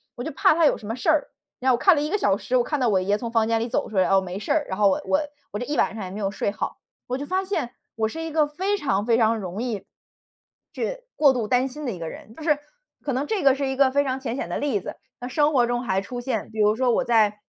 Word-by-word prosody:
我 245 Hz, -, -5 dB
就 -, -, -4 dB
怕 280 Hz, -, +4 dB
他 330 Hz, -, +4 dB
有 -, -, +3 dB
什 210 Hz, -, -10 dB
么 225 Hz, -, -2 dB
事 255 Hz, +6 st, -1 dB
儿。 305 Hz, -2 st, +2 dB, 0.3 s
然 260 Hz, 0 st, +3 dB
后 -, -, +5 dB
我 -, -, -5 dB
看 375 Hz, +4 st, +6 dB
了 290 Hz, -, 0 dB
1 300 Hz, -, -1 dB
个 415 Hz, -, +1 dB
小 200 Hz, -, +2 dB
时， 255 Hz, +4 st, 0 dB
我 245 Hz, -, +3 dB
看 295 Hz, +2 st, -2 dB
到 245 Hz, -3 st, +2 dB
我 195 Hz, -, +3 dB
爷 200 Hz, +2 st, +1 dB
从 230 Hz, +1 st, -5 dB
房 225 Hz, -2 st, +2 dB
间 225 Hz, 0 st, +2 dB
里 235 Hz, -, -2 dB
走 -, -, -1 dB
出 210 Hz, -, -9 dB
来， 185 Hz, -, +5 dB
哦， 195 Hz, -, +5 dB
没 185 Hz, +1 st, -5 dB
事 215 Hz, -, -4 dB
儿， 310 Hz, -2 st, +1 dB
然 190 Hz, -, -3 dB
后 200 Hz, -1 st, +6 dB
我 295 Hz, -, 0 dB
我 290 Hz, +2 st, +2 dB, 0.3 s
我 205 Hz, -, -4 dB
这 245 Hz, -, -3 dB
一 295 Hz, -, -2 dB
晚 -, -, +2 dB
上 210 Hz, -, -5 dB
也 185 Hz, -, -7 dB
没 200 Hz, -, -6 dB
有 195 Hz, -2 st, 0 dB
睡 200 Hz, -, -1 dB
好。 -, -, -4 dB, 0.3 s
我 255 Hz, +1 st, -2 dB
就 285 Hz, -, -5 dB
发 375 Hz, +5 st, 0 dB
现， 370 Hz, -11 st, -2 dB, 0.2 s
我 220 Hz, -1 st, +1 dB
是 325 Hz, +8 st, -6 dB
一 325 Hz, -, -4 dB
个 305 Hz, -1 st, +3 dB
非 380 Hz, +7 st, -1 dB
常 205 Hz, -, 0 dB
非 230 Hz, -1 st, +3 dB
常 225 Hz, -1 st, +3 dB
容 190 Hz, +1 st, -5 dB
易 225 Hz, -6 st, -3 dB, 0.9 s
去 -, -, -4 dB
过 285 Hz, -3 st, +6 dB
度 235 Hz, -4 st, -2 dB
担 255 Hz, +3 st, +2 dB
心 295 Hz, +3 st, -7 dB
的 245 Hz, -, -1 dB
一 185 Hz, -, -7 dB
个 165 Hz, -1 st, -4 dB
人。 220 Hz, -, -11 dB
就 -, -, -11 dB
是， 300 Hz, -3 st, +2 dB, 0.4 s
可 280 Hz, -, -2 dB
能 265 Hz, +3 st, -1 dB
这 410 Hz, -8 st, -1 dB
个 270 Hz, -1 st, +6 dB
是 275 Hz, -1 st, -2 dB
一 265 Hz, -, -2 dB
个 265 Hz, -1 st, +4 dB
非 285 Hz, +2 st, +3 dB
常 260 Hz, 0 st, -1 dB
浅 250 Hz, -2 st, -3 dB
显 -, -, -4 dB
的 -, -, -2 dB
例 275 Hz, -8 st, 0 dB
子， -, -, -7 dB, 0.3 s
那 245 Hz, -, -4 dB
生 295 Hz, +4 st, +2 dB
活 245 Hz, -3 st, +4 dB
中 245 Hz, 0 st, -1 dB
还 190 Hz, -5 st, 0 dB
出 245 Hz, +5 st, -6 dB
现 260 Hz, +1 st, -3 dB
比 220 Hz, -, -7 dB
如 210 Hz, 0 st, +4 dB
说 250 Hz, +1 st, +2 dB
我 -, -, +2 dB
在， 215 Hz, -3 st, +3 dB
245 Hz, 335 characters per minute, -24 LUFS, 215-290 Hz, 0.9 s, 看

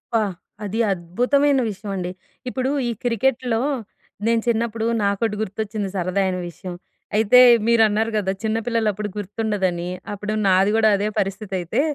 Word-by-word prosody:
అబ్బా! 225 Hz, -, +4 dB, 0.4 s
అది 210 Hz, +3 st, -3 dB
అద్భుతమైన 250 Hz, +11 st, +2 dB
విషయం 205 Hz, 0 st, -7 dB
అండి. 180 Hz, -1 st, -3 dB, 0.4 s
ఇప్పుడు 255 Hz, +1 st, -1 dB, 0.2 s
ఈ -, -, 0 dB
క్రికెట్‌లో 245 Hz, 0 st, +1 dB, 0.7 s
నేను 230 Hz, 0 st, +3 dB
చిన్నప్పుడు 230 Hz, -1 st, 0 dB, 0.2 s
నాకొకటి 200 Hz, +2 st, 0 dB
గుర్తొచ్చింది 210 Hz, 0 st, -3 dB
సరదా 185 Hz, +1 st, 0 dB
అయిన 185 Hz, -1 st, -1 dB
విషయం. 180 Hz, +1 st, -8 dB, 0.4 s
అయితే 220 Hz, +3 st, +6 dB, 0.3 s
మీరు 235 Hz, -1 st, +5 dB
అన్నారు 220 Hz, +2 st, 0 dB
కదా! 195 Hz, -2 st, 0 dB
చిన్న 220 Hz, 0 st, 0 dB
పిల్లలు 230 Hz, -2 st, +1 dB
అప్పుడు 210 Hz, +1 st, -4 dB
గుర్తుండదని. 200 Hz, -4 st, -2 dB, 0.3 s
అప్పుడు 210 Hz, +1 st, -4 dB
నాది 190 Hz, +2 st, +4 dB
గూడా 220 Hz, -1 st, +4 dB
అదే 205 Hz, +1 st, -1 dB
పరిస్థితి 195 Hz, 0 st, -3 dB
అయితే. 180 Hz, +9 st, 0 dB
210 Hz, 145 wpm, -22 LUFS, 195-230 Hz, 0.7 s, అయితే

